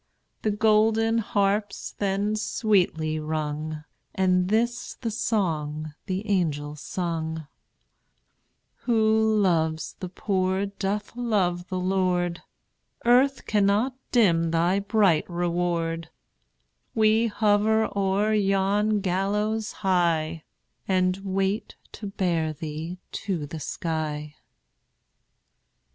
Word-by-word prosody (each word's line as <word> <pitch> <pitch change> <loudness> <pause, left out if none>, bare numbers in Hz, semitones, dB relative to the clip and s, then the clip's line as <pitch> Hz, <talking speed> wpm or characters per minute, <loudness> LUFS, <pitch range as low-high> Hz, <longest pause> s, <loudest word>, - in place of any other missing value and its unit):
The 215 - 0
golden 220 +2 +3
harps 205 -1 0
then 200 +1 0
sweetly 180 -8 +1
rung, 155 0 -3 0.3
And 185 -2 +2
this 235 +3 0
the 230 -3 -4
song 155 -9 -1
the 190 +3 -3
angels 150 -6 -1
sung: 160 -3 -3 1.4
"Who 220 -1 +3
loves 160 -5 +1
the 185 - -5
poor 190 0 0
doth 200 +2 -3
love 190 -7 0
the 185 - -3
Lord; 180 -2 0 0.6
Earth 260 +3 +4
cannot 210 +5 +2 0.2
dim 170 -9 +4
thy 170 +4 +2
bright 200 -6 +2
reward: 170 -1 -1 0.9
We 220 +1 +4
hover 215 0 +2
o'er 200 +2 +1
yon 205 +1 +2
gallows 210 +4 0
high, 165 -3 +1 0.4
And 185 -1 +2
wait 195 +2 -2 0.2
to 210 - -7
bear 170 -5 0
thee 160 +3 -6
to 180 -7 -3
the 155 +2 -7
sky." 150 -1 -3
190 Hz, 95 wpm, -26 LUFS, 165-210 Hz, 1.4 s, Earth